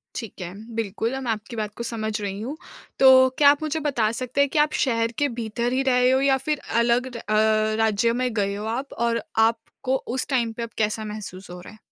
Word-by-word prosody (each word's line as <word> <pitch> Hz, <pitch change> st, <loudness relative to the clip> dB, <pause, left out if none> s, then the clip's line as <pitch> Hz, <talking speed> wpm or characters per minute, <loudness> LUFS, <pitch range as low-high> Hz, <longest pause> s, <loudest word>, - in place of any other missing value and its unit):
ठीक 225 Hz, -5 st, -7 dB
है। 180 Hz, +1 st, -6 dB, 0.2 s
बिल्कुल 225 Hz, +3 st, -2 dB
मैं 245 Hz, -3 st, -3 dB
आपकी 225 Hz, +2 st, -4 dB
बात 210 Hz, -1 st, -4 dB
को 235 Hz, -, -5 dB
समझ 220 Hz, -2 st, -3 dB
रही 200 Hz, 0 st, -4 dB
हूँ। 270 Hz, +7 st, -5 dB, 0.4 s
तो 260 Hz, -1 st, +7 dB
क्या 285 Hz, -1 st, +8 dB
आप 290 Hz, +2 st, +1 dB
मुझे 310 Hz, +1 st, -2 dB
बता 240 Hz, -7 st, +1 dB
सकते 255 Hz, +3 st, -3 dB
हैं 280 Hz, -, +4 dB
कि 305 Hz, -, 0 dB
आप 300 Hz, 0 st, +3 dB
शहर 230 Hz, -2 st, 0 dB
के 290 Hz, 0 st, +2 dB
भीतर 235 Hz, +2 st, -2 dB
ही 265 Hz, +1 st, +1 dB
रहे 250 Hz, -1 st, +3 dB
हो 260 Hz, +1 st, +3 dB
या 275 Hz, -1 st, +3 dB
फिर 300 Hz, -2 st, 0 dB, 0.2 s
अलग 240 Hz, +2 st, +2 dB
र -, -, -5 dB
अ, 215 Hz, 0 st, +2 dB
राज्य 225 Hz, +1 st, +2 dB
में 250 Hz, 0 st, -1 dB
गए 200 Hz, -2 st, 0 dB
हो 210 Hz, +1 st, -5 dB
आप 250 Hz, +5 st, -3 dB
और 235 Hz, 0 st, 0 dB, 0.3 s
आपको 255 Hz, +3 st, -3 dB, 0.2 s
उस 260 Hz, -, -1 dB
टाइम 240 Hz, -4 st, 0 dB
पे 235 Hz, -, -6 dB
अब 230 Hz, -, -5 dB
कैसा 215 Hz, 0 st, 0 dB
महसूस 200 Hz, -3 st, -8 dB
हो 180 Hz, 0 st, -8 dB
रहा 180 Hz, -, -12 dB
है? 215 Hz, -, -16 dB
230 Hz, 230 wpm, -24 LUFS, 215-260 Hz, 0.4 s, क्या